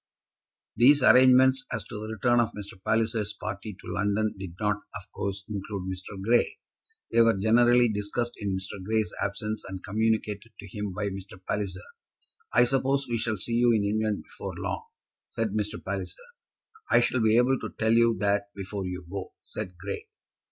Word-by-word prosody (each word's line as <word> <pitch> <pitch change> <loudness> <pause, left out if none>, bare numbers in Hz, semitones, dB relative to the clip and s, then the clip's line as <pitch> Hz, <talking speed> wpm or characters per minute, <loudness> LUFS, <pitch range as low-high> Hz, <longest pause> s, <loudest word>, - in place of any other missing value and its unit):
These 140 +3 +6
arrangements 130 +1 +6
as - - -2
to 105 - -7
the 110 +1 -5
return 120 +1 +3
of 115 - +1
Mr. 100 -2 -9
Palliser's 110 -1 0
party 105 0 -5
to - - -8
London 105 +2 +1
did 95 -3 -8
not, 105 -1 +1 0.2
of 105 -3 -9
course, 100 0 -4
include 100 -2 -4
Mr. 95 +2 -7
Grey. 115 +5 +2 0.5
They 115 - +5
were 115 -3 +4
generally 120 +4 +5
discussed 110 +3 -2
in 100 -2 -2
Mr. 95 0 -7
Grey's 110 +1 0
absence, 105 +2 -2
and 95 -1 -7
communicated 110 +1 -1
to 100 - -9
him 105 -1 -3
by 100 +2 -2
Mr. 95 -1 -8
Palliser. 100 -3 -2 0.7
"I 120 - +6
suppose 135 +2 +1
we 120 -1 -1
shall 110 -1 -1
see 115 +5 -4
you 120 +1 +4
in 105 - +2
England 105 0 0
before - - -7
long?" - - -4 0.4
said 115 -1 -2
Mr. 105 0 -1
Palliser. 95 -1 -3 0.7
"I - - +6
shall 120 +1 +1
be 110 0 +4
able 125 +2 +3
to - - -5
tell 110 0 +2
you 115 0 +4
that 100 0 +1
before 100 -1 -4
you 90 0 -5
go," 95 +1 -6
said 90 -1 -6
Grey. 100 +2 -5
105 Hz, 175 wpm, -27 LUFS, 100-115 Hz, 0.7 s, These